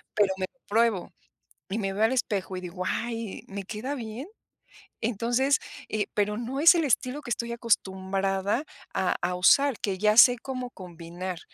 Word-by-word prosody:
pero 200 -2 +3
me 185 -1 -2
lo 265 - -40
pruebo 225 -3 +1 0.6
y 200 +3 -2
me 195 -3 -1
veo 205 +2 -1
al 225 - +3
espejo 200 -6 -1
y 185 - -4
digo: 180 +1 -6
"Ay, 230 -3 -3
me 200 0 -6
queda 225 +8 -4
bien", 235 +2 -6 0.8
entonces, 240 +5 +2 0.3
eh, 215 -1 0
pero 210 0 0
no 255 +4 -3
es 335 +3 +8
el 330 -2 +2
estilo 260 +2 0
que 240 - -8
estoy 235 +1 -2
acostumbrada 195 0 0 0.3
a 185 - +1
a 180 +1 -1
usar 260 +8 +4
que 190 -2 -1
ya 210 +1 +3
sé 245 +1 +9
cómo 255 0 -5
combinar, 175 -1 -7
215 Hz, 170 wpm, -27 LUFS, 190-245 Hz, 0.8 s, sé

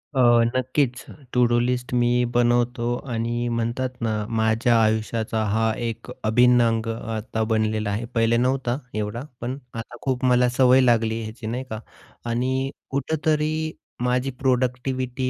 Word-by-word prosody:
अ, 130 - +1 0.4
नक्कीच. 130 0 0 0.3
To do 120 -1 +3
list 125 +1 -1
मी 120 0 +3 0.2
बनवतो 120 0 +2 0.2
आणि 120 +1 -1
म्हणतात 120 +2 -1
ना 115 -1 0 0.3
माझ्या 110 +2 +2
आयुष्याचा 110 0 0
हा 110 +2 +2
एक 115 -1 -5
अभिन्न 125 +2 +5
अंग 115 0 -1 0.3
आता 110 0 -2
बनलेला 110 -1 0
आहे. 105 +4 -2
पहिले 115 0 +3
नव्हता 125 0 0 0.2
एवढा 105 +2 -3 0.2
पण 125 +3 -3 0.2
आता 115 +1 -7
खूप 130 -1 -1
मला 125 0 +4
सवय 130 0 +6
लागली 115 -2 +2
ह्याची. 110 +1 -7
नाही 125 +3 -3
का 110 -1 -4 0.5
आणि 130 +3 0 0.2
कुठेतरी 155 +2 0 0.3
माझी 125 +2 0
प्रोडक्टिविटी 130 0 0
120 Hz, 135 wpm, -23 LUFS, 115-130 Hz, 0.5 s, सवय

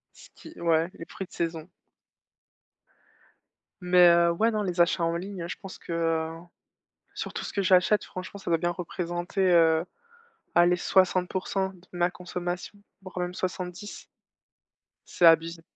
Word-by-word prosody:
Ce - - -16
qui 320 - -13
ouais, 165 0 +2
les 165 - -7
fruits 190 - -8
de - - -38
saison. 165 0 -3 2.1
Mais, 180 0 +6
heu, 170 0 +5
ouais, 220 +7 +2
non, 215 -2 -1
les 180 -2 0
achats 175 0 +2
en 165 0 0
ligne, 190 0 -6
hein, - - -5
je 180 - -5
pense 195 -3 -9
que, - - -10
heu, 165 -1 0 0.8
sur - - -5
tout - - -4
ce - - -5
que 200 - -1
j'achète, 185 +3 +4
franchement, 185 +2 -8
ça 180 - -4
doit 165 - +3
bien 175 - 0
représenter, 175 +1 -4
heu, 165 -1 +4 0.7
allez 175 +1 +5
60% 185 +1 +1
de 185 -1 -17
ma 175 0 +1
consommation, 180 +2 -5 0.2
voire 185 -1 -8
même 180 0 -2
70. 180 +2 -6 1.0
C'est - - -1
abusé. 165 0 +4
175 Hz, 155 wpm, -27 LUFS, 170-185 Hz, 2.1 s, Mais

